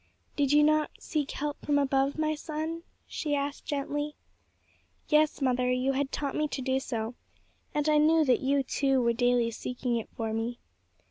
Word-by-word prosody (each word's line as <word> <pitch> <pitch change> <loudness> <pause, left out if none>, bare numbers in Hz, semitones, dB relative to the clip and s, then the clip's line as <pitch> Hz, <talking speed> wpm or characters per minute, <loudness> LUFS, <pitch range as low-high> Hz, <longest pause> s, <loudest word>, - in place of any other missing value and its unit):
"Did 285 -2 +1
you 295 0 +6
not 305 0 +3
seek 300 -4 -2
help 295 0 -4
from 290 -1 +2
above, 275 0 +1
my 310 0 +1
son?" 315 +2 -4 0.2
she 295 -2 -2
asked 280 0 -3
gently. 290 +1 -2 0.9
"Yes, 300 -1 +3
mother; 250 -1 +2
you 255 +2 +1
had 270 0 -1
taught 280 -2 -2
me 305 - +1
to 280 - -4
do 260 0 +1
so, 230 -3 -3 0.6
and 295 0 +1
I 305 -1 +5
knew 315 +1 +4
that 255 -3 +3
you, 275 +1 +1
too, 270 0 +1
were 235 0 +3
daily 245 0 +2
seeking 245 +1 -2
it 225 - -5
for 225 -1 -2
me." 230 +2 -2
280 Hz, 180 wpm, -29 LUFS, 250-300 Hz, 0.9 s, you